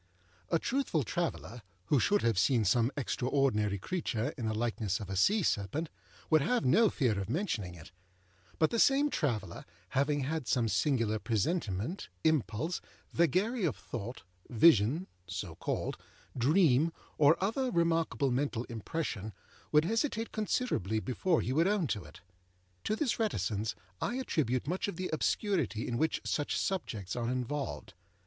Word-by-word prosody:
A -, -, +3 dB
truthful 235 Hz, -, 0 dB
traveller, 125 Hz, -3 st, -3 dB, 0.2 s
who 145 Hz, -, +3 dB
should 205 Hz, -, +2 dB
have 115 Hz, -5 st, +2 dB
seen 115 Hz, +2 st, +3 dB
some 115 Hz, +5 st, +3 dB
extraordinary 125 Hz, -6 st, +1 dB
creature 120 Hz, -, -2 dB
in 115 Hz, -, -3 dB
the 110 Hz, -, 0 dB
likeness 110 Hz, -4 st, -1 dB
of 100 Hz, -2 st, -6 dB
a -, -, -2 dB
sea 200 Hz, -, +3 dB
serpent, 145 Hz, -, -1 dB, 0.4 s
would 155 Hz, -1 st, +6 dB
have 245 Hz, -, +1 dB
no 215 Hz, -, +5 dB
fear 120 Hz, -, +1 dB
of 100 Hz, 0 st, -4 dB
mentioning 115 Hz, -, -2 dB
it; 80 Hz, -1 st, -13 dB, 0.7 s
but 155 Hz, -, +3 dB
the 230 Hz, -, 0 dB
same 280 Hz, +3 st, +4 dB
traveller, 110 Hz, -, -2 dB, 0.3 s
having 140 Hz, +3 st, +1 dB
had 150 Hz, 0 st, -2 dB
some 120 Hz, -2 st, +2 dB
singular 115 Hz, -4 st, +1 dB
presentiment, 115 Hz, -, -1 dB
impulse, 155 Hz, +1 st, 0 dB, 0.3 s
vagary 190 Hz, +8 st, +2 dB
of -, -, +1 dB
thought, 120 Hz, +1 st, -7 dB, 0.3 s
vision 130 Hz, -, +5 dB, 0.2 s
(so 90 Hz, -1 st, -5 dB
called), -, -, -3 dB, 0.4 s
dream, 150 Hz, +2 st, +4 dB, 0.3 s
or 150 Hz, +2 st, +6 dB
other 230 Hz, +7 st, 0 dB
remarkable 165 Hz, -, +1 dB
mental 125 Hz, -2 st, 0 dB
impression, 115 Hz, -, -4 dB, 0.4 s
would 150 Hz, +1 st, +5 dB
hesitate 225 Hz, -, -1 dB
considerably 205 Hz, -, 0 dB
before 155 Hz, -, 0 dB
he 130 Hz, -, -2 dB
would 165 Hz, +5 st, +3 dB
own 205 Hz, -4 st, +2 dB
to 105 Hz, -9 st, -2 dB
it. 75 Hz, -2 st, -14 dB, 0.6 s
To 215 Hz, -, +1 dB
this 245 Hz, 0 st, 0 dB
reticence 110 Hz, -, -1 dB, 0.3 s
I 240 Hz, -, -1 dB
attribute 150 Hz, -, 0 dB
much 180 Hz, +5 st, -1 dB
of 200 Hz, -, -4 dB
the 185 Hz, +2 st, -4 dB
obscurity 170 Hz, -, 0 dB
in 120 Hz, 0 st, -2 dB
which 160 Hz, -, +1 dB
such 145 Hz, -, -1 dB
subjects 110 Hz, -, -2 dB
are 120 Hz, -1 st, -1 dB
involved. 130 Hz, +3 st, -3 dB
140 Hz, 150 wpm, -32 LUFS, 110-175 Hz, 0.7 s, would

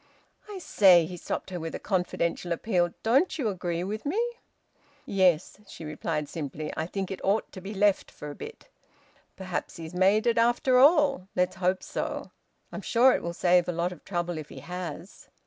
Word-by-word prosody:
"I 410 Hz, -, -6 dB
say," 185 Hz, -, +5 dB
he 180 Hz, +2 st, -7 dB
stopped 175 Hz, -, -5 dB
her, 180 Hz, -, -4 dB
with 165 Hz, 0 st, -5 dB
a -, -, -5 dB
confidential 180 Hz, -2 st, -1 dB
appeal. 175 Hz, -1 st, +1 dB
"Don't 270 Hz, +10 st, +3 dB
you 250 Hz, -8 st, 0 dB
agree 175 Hz, -3 st, -3 dB
with 210 Hz, +3 st, -4 dB
me?" 315 Hz, +10 st, -1 dB, 0.9 s
"Yes," 185 Hz, -2 st, +2 dB
she 165 Hz, -, -9 dB
replied 150 Hz, 0 st, -3 dB
simply. 150 Hz, 0 st, -5 dB
"I 160 Hz, -, -2 dB
think 195 Hz, +1 st, -4 dB
it 190 Hz, -, -6 dB
ought 205 Hz, +3 st, +1 dB
to 185 Hz, -, -9 dB
be 200 Hz, +3 st, -7 dB
left 200 Hz, 0 st, +2 dB
for 150 Hz, -, -8 dB
a -, -, -9 dB
bit. 455 Hz, -, -10 dB, 0.7 s
Perhaps 185 Hz, -2 st, -4 dB
he's 160 Hz, 0 st, -8 dB
made 195 Hz, +5 st, +3 dB
it, 235 Hz, -1 st, +3 dB
after 240 Hz, +2 st, +3 dB
all. 280 Hz, -, +5 dB
Let's 180 Hz, +1 st, +1 dB
hope 185 Hz, 0 st, 0 dB
so. -, -, -4 dB, 0.4 s
I'm -, -, -6 dB
sure 250 Hz, +2 st, +4 dB
it -, -, -1 dB
will 170 Hz, 0 st, -4 dB
save 180 Hz, -1 st, +3 dB
a -, -, 0 dB
lot 170 Hz, +2 st, -1 dB
of 180 Hz, -, -11 dB
trouble 175 Hz, -3 st, -3 dB
if 150 Hz, -, -9 dB
he -, -, -10 dB
has." 180 Hz, 0 st, -7 dB
185 Hz, 190 wpm, -27 LUFS, 170-215 Hz, 0.9 s, say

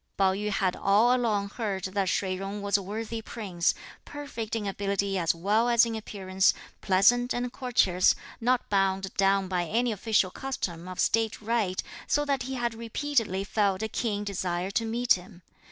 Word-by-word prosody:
Pao 190 Hz, -1 st, +3 dB
yü 210 Hz, +2 st, -2 dB
had 195 Hz, -3 st, 0 dB
all 215 Hz, +6 st, +4 dB
along 215 Hz, -5 st, 0 dB
heard 200 Hz, -4 st, -3 dB
that 190 Hz, 0 st, -1 dB
Shih 190 Hz, 0 st, 0 dB
Jung 195 Hz, +2 st, -5 dB
was 200 Hz, 0 st, +1 dB
a 200 Hz, -, +3 dB
worthy 220 Hz, +3 st, -5 dB
Prince, 190 Hz, -7 st, -1 dB, 0.3 s
perfect 280 Hz, -7 st, -6 dB
in 220 Hz, -2 st, -2 dB
ability 200 Hz, 0 st, -1 dB
as 170 Hz, -3 st, +1 dB
well 210 Hz, +7 st, +2 dB
as 235 Hz, -1 st, +6 dB
in 230 Hz, -, -3 dB
appearance, 190 Hz, -3 st, +1 dB, 0.3 s
pleasant 245 Hz, +6 st, +3 dB
and 245 Hz, 0 st, -3 dB
courteous, 195 Hz, -8 st, +3 dB, 0.2 s
not 245 Hz, +1 st, +1 dB
bound 195 Hz, -1 st, 0 dB
down 195 Hz, 0 st, +2 dB
by 180 Hz, -2 st, -1 dB
any 235 Hz, +7 st, +1 dB
official 210 Hz, -2 st, +1 dB
custom 180 Hz, -10 st, -4 dB
or 185 Hz, -, -6 dB
state 225 Hz, -1 st, +1 dB
rite, 215 Hz, -4 st, -1 dB, 0.2 s
so 295 Hz, 0 st, +1 dB
that 280 Hz, -2 st, 0 dB
he 260 Hz, +1 st, -4 dB
had 240 Hz, -2 st, -1 dB
repeatedly 230 Hz, -3 st, -1 dB
felt 200 Hz, -1 st, 0 dB
a -, -, 0 dB
keen 210 Hz, -2 st, -2 dB
desire 185 Hz, -2 st, -2 dB
to 225 Hz, +3 st, 0 dB
meet 235 Hz, +2 st, +3 dB
him. 180 Hz, 0 st, -8 dB
205 Hz, 175 wpm, -28 LUFS, 190-230 Hz, 0.3 s, as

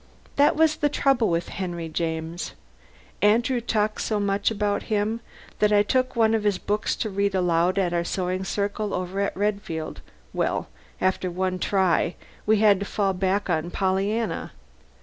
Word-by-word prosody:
That 285 Hz, +1 st, +4 dB
was 315 Hz, -1 st, +3 dB
the 295 Hz, -1 st, +2 dB
trouble 270 Hz, -5 st, +2 dB
with 170 Hz, 0 st, -1 dB
Henry 175 Hz, -3 st, -4 dB
James. 160 Hz, +1 st, -3 dB, 0.7 s
Andrew 235 Hz, +5 st, +3 dB
talked 215 Hz, -2 st, 0 dB
so 215 Hz, -2 st, 0 dB
much 200 Hz, 0 st, +1 dB
about 205 Hz, -2 st, 0 dB
him 215 Hz, +2 st, 0 dB, 0.4 s
that 210 Hz, 0 st, +3 dB
I 205 Hz, 0 st, +5 dB
took 255 Hz, +4 st, 0 dB
one 225 Hz, -1 st, +3 dB
of 220 Hz, -2 st, +1 dB
his 205 Hz, -3 st, +2 dB
books 210 Hz, +3 st, -1 dB
to 220 Hz, -, -2 dB
read 200 Hz, 0 st, 0 dB
aloud 180 Hz, 0 st, +2 dB
at 180 Hz, -3 st, +1 dB
our 170 Hz, 0 st, +1 dB
sewing 185 Hz, +1 st, -2 dB
circle 205 Hz, +1 st, -2 dB
over 185 Hz, +2 st, -3 dB
at 200 Hz, -1 st, -1 dB
Redfield. 200 Hz, -6 st, -2 dB, 0.3 s
Well, -, -, -1 dB, 0.3 s
after 185 Hz, 0 st, 0 dB
one 185 Hz, +1 st, -1 dB
try 185 Hz, -3 st, +2 dB, 0.3 s
we 220 Hz, 0 st, +5 dB
had 205 Hz, -2 st, +5 dB
to 200 Hz, -, -3 dB
fall 195 Hz, -2 st, 0 dB
back 190 Hz, +2 st, 0 dB
on 170 Hz, -1 st, 0 dB
"Pollyanna." 195 Hz, +5 st, -1 dB
200 Hz, 165 wpm, -25 LUFS, 180-215 Hz, 0.7 s, I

